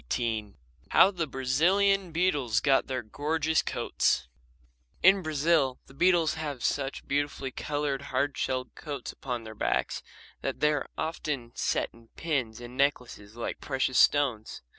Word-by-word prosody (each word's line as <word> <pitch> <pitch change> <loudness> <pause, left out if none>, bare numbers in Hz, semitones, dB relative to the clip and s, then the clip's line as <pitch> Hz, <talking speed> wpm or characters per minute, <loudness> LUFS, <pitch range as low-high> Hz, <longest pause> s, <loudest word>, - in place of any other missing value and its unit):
XVIII 110 -4 -1 0.3
How 195 - +6
the 170 -5 -2
Brazilian 175 +9 +2
Beetles 150 -9 +1
Got 135 -2 +3
Their 130 -2 -3
Gorgeous 155 +7 0
Coats - - 0 0.8
In 190 +1 +7
Brazil 155 -4 +1
the - - -17
beetles 170 +1 +3
have 145 -5 -5
such 140 -1 -2
beautifully 140 -1 -1
coloured, 145 0 -2
hard 135 +2 0
shelled 130 -1 -2
coats 145 -5 -6
upon 125 -3 -5
their 110 0 -8
backs 105 - -1 0.4
that - - -3
they 150 0 +3
are 145 - -3
often 150 -6 -3
set - - -1
in 115 0 -19
pins 130 -9 -2
and 120 +1 -9
necklaces 125 -6 -1
like 120 - -5
precious 130 -2 0
stones. 125 - +2
140 Hz, 140 wpm, -28 LUFS, 125-155 Hz, 0.8 s, In